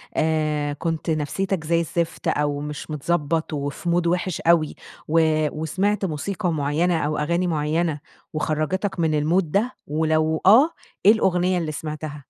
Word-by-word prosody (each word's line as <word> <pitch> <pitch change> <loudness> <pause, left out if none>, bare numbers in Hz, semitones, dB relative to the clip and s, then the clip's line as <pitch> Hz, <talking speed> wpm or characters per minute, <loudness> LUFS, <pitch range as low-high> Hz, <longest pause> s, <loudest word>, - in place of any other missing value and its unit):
آآ 155 -2 0
كنت 165 +2 -3
نفسيتك 160 +4 -1
زي 165 +1 +2
الزفت، 170 0 -2
أو 145 -1 0
مش 150 +1 -6
متضبط 160 +1 -1
وفي 145 +4 -3
مود 170 0 +2
وِحش 180 0 -1
أوي 165 -2 +3 0.3
و 165 +2 +3 0.4
وسمعت 195 +5 0
موسيقى 180 +4 -2
مُعينة 160 +3 +1
أو 150 0 -1
أغاني 170 +4 0
معينة، 155 0 0 0.3
وخرَّجِتك 170 +6 -1
من 160 -2 +2
المود 160 +2 +1
ده، 225 +6 +1
ولو 155 +1 +1
آه، 250 - +7 0.4
إيه 210 - +9
الأغنية 185 -4 +2
اللي 160 -3 -2
سمعتها؟ 155 0 -5
160 Hz, 140 wpm, -23 LUFS, 150-175 Hz, 0.4 s, إيه